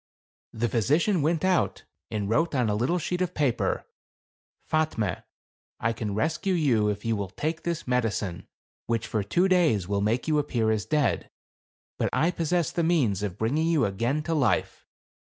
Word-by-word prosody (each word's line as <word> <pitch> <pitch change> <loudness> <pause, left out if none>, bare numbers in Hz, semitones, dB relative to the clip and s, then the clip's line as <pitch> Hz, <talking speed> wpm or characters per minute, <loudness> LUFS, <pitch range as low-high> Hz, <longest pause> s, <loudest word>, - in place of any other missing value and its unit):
The 115 +2 -1
physician 150 - +2
went 165 +4 +1
out 185 -2 +1 0.3
and 105 -2 -2
wrote 150 +8 +1
on 125 -4 +2
a - - +1
little 125 +12 +1
sheet 180 +1 -2
of 180 - -1
paper, 140 -6 0 0.4
" - - -47
Fatme, 155 - 0 0.6
I 115 +1 0
can 105 -3 -4
rescue 160 - 0
you 120 -10 +2
if 105 +1 -4
you 115 -1 +1
will 100 -2 -3
take 155 - -3
this 170 -5 -3
medicine, 105 -7 -1 0.4
which 115 -2 0
for 110 - -1
two 170 - +2
days, 160 - +3
will 100 0 0
make 115 +7 0
you 155 -1 +3
appear 120 -6 0
as 110 -2 -1
dead; 145 - +1 0.7
but - - +1
I 165 +3 +2
possess 170 0 0
the 170 - -1
means 145 - +2
of 100 -2 -3
bringing 145 +10 +1
you 160 -7 +3
again 115 +10 -1
to 165 - -2
life. 140 -7 0
125 Hz, 175 wpm, -27 LUFS, 105-160 Hz, 0.7 s, days